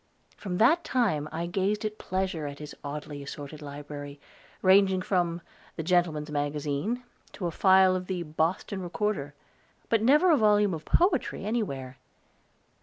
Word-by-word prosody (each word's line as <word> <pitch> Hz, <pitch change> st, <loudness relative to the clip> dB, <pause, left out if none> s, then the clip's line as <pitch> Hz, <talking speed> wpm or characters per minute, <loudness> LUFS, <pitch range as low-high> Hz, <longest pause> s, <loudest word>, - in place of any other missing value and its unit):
From 180 Hz, -3 st, -4 dB
that 310 Hz, -, +4 dB
time 200 Hz, -, 0 dB
I 165 Hz, +1 st, -3 dB
grazed 195 Hz, +4 st, -1 dB
at 215 Hz, 0 st, -4 dB
pleasure 185 Hz, -5 st, -2 dB
in 140 Hz, 0 st, -7 dB
his 150 Hz, 0 st, -9 dB
oddly 145 Hz, 0 st, -6 dB
assorted 145 Hz, +2 st, -8 dB
library, 145 Hz, 0 st, -8 dB, 0.4 s
ranging 190 Hz, -1 st, +5 dB
from 175 Hz, -3 st, 0 dB, 0.3 s
"The 160 Hz, -, -4 dB
Gentleman's 160 Hz, -3 st, +1 dB
Magazine" 150 Hz, -, -2 dB, 0.3 s
to 185 Hz, -, -5 dB
a 170 Hz, -, -1 dB
file 190 Hz, +1 st, +5 dB
of 185 Hz, 0 st, -4 dB
the 180 Hz, -2 st, -2 dB
"Boston 165 Hz, +5 st, -1 dB
Recorder"; 175 Hz, -5 st, -2 dB, 0.5 s
but 225 Hz, -2 st, +3 dB
never 300 Hz, +10 st, +5 dB
a 310 Hz, -, +5 dB
volume 210 Hz, -3 st, +4 dB
of 155 Hz, -1 st, -6 dB
poetry 335 Hz, -, +1 dB
anywhere. 135 Hz, -, -3 dB
180 Hz, 145 wpm, -28 LUFS, 150-210 Hz, 0.5 s, ranging